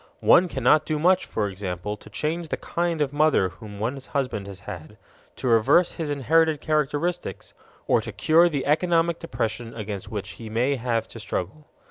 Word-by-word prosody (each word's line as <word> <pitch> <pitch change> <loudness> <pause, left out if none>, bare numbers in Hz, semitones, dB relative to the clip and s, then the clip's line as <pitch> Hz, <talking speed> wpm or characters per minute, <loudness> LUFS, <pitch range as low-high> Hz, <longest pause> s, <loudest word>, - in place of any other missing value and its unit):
One 180 +1 +6
cannot 140 0 +3
do 155 - -2
much, 180 +4 +3
for 105 -2 -1
example, 95 0 -4
to 105 - -15
change 165 +2 -2
the - - -3
kind 170 -3 -1
of 140 -1 -4
mother 150 -10 +3
whom 105 +2 -11
one's 130 +5 -3
husband 125 -8 -2
has 100 -1 -9
had, 100 +1 -9 0.4
to - - -4
reverse 120 +10 +4
his 160 -3 -4
inherited 155 +2 +2
characteristics, 155 +3 -2 0.3
or - - +3
to - - -6
cure 170 +2 +4
the 140 -5 -2
economic 165 +2 +2
depression 115 -7 -4
against 105 -3 -5
which 105 -3 -5
he 110 - -7
may 125 +6 +1
have 115 -2 -1
to 115 - -10
struggle. 145 - -4
140 Hz, 175 wpm, -25 LUFS, 110-160 Hz, 0.4 s, One